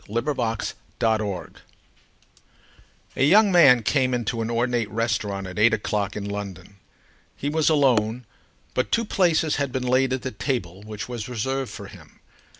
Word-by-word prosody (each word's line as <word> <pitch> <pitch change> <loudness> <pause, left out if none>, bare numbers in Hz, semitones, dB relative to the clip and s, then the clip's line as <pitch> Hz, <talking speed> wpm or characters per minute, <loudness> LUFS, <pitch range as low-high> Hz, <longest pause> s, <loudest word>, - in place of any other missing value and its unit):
THE 115 +3 0
GUEST 120 -6 -2 2.4
A - - +1
young 200 +7 +6
man 135 -10 +6
came 130 0 +1
into 115 -1 -2
an 115 - -2
ornate 120 -1 0
restaurant 110 -3 -2
at 95 +1 -6
eight 110 +1 +5
o'clock 105 -1 -2
in 100 -1 -4
London. 100 -1 -7 0.6
He 145 - -3
was 155 +1 +2
alone, 125 -6 +2 0.5
but 130 - -1
two 230 0 +2
places 170 -6 +2
had 140 -2 -1
been 130 0 -2
laid 130 +1 +2
at 130 -1 -2
the 130 - -3
table 100 -11 -3
which 105 0 -7
was 120 -2 -6
reserved 130 +3 -2
for - - -8
him. - - -15
120 Hz, 150 wpm, -24 LUFS, 105-135 Hz, 2.4 s, young